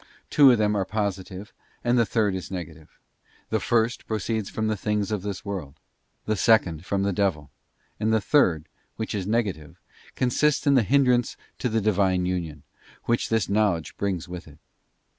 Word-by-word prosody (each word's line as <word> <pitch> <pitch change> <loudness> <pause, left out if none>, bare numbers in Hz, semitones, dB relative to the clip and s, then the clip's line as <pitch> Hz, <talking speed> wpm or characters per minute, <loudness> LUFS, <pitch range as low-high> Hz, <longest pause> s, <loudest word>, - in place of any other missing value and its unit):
Two 140 -3 +7
of 120 - +4
them 105 -1 +1
are 100 - +1
positive, 100 -1 -4 0.3
and 120 0 +2
the 115 -3 +3
third 105 -4 +1
is 95 -1 -5
negative. 80 -4 -8 0.5
The 110 - +2
first 115 +2 0
proceeds 110 -1 -2
from 110 - -3
the 110 0 0
things 105 +1 -1
of 105 -3 -1
this 100 0 -5
world; 90 -9 -5
_ - - -36 0.5
the 110 - 0
second 90 -6 +2
from 100 +1 0
the 100 0 0
devil; 85 -7 -1 0.5
and 110 +1 +1
the 110 - +3
third, 90 - +2 0.3
which 110 0 -4
is 100 -3 -3
negative, 100 -10 -2 0.4
consists 140 +4 +1
in 140 - +4
the 130 - +5
hindrance 125 +1 +2 0.2
to 125 - -1
the 110 0 0
Divine 95 -3 +2
union, 85 -5 -3 0.4
which 120 0 0
this 110 -3 +1
knowledge 100 -5 0
brings 95 -5 -2
with 90 -2 -8
it. 75 -2 -15
105 Hz, 180 wpm, -25 LUFS, 90-110 Hz, 0.5 s, Two